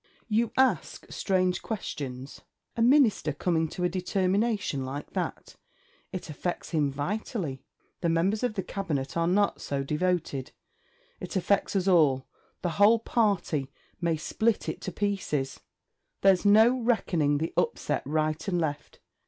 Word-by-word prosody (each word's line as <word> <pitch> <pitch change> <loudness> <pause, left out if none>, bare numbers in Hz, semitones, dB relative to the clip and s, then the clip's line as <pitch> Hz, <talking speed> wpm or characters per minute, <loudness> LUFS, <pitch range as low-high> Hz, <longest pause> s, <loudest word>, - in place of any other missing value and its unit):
You 225 0 +1
ask 255 - +1
strange 185 -1 +1
questions. 140 - -5 0.3
A 230 - -1
Minister 240 - +4
coming 160 +1 0
to 180 - -5
a - - +4
determination 190 - 0
like 135 +3 -6
that! - - -4 0.5
It 185 - -5
affects 170 +3 -4
him 150 -4 +2
vitally. 150 - -3 0.4
The 170 - 0
members 180 +6 +1
of 245 -4 -1
the 190 - -2
Cabinet 150 -9 -3
are 170 0 +1
not 200 +3 +2
so 140 -1 -2
devoted.... 150 -3 -1 0.7
It - - -7
affects 195 +2 +1
us 190 -1 +1
all 150 -8 +4 0.4
the 170 -3 -2
whole 220 +3 +7
Party; 200 - 0 0.3
may 165 -2 +1
split 220 +8 0
it - - -4
to 185 - -4
pieces! 180 -9 -2 0.6
There's 195 0 +4
no 220 +5 +6
reckoning 175 -11 +1
the 160 +3 -3
upset 465 - 0
right 155 +2 -1
and 180 -3 +1
left. 150 -3 -3
180 Hz, 140 wpm, -28 LUFS, 150-205 Hz, 0.7 s, whole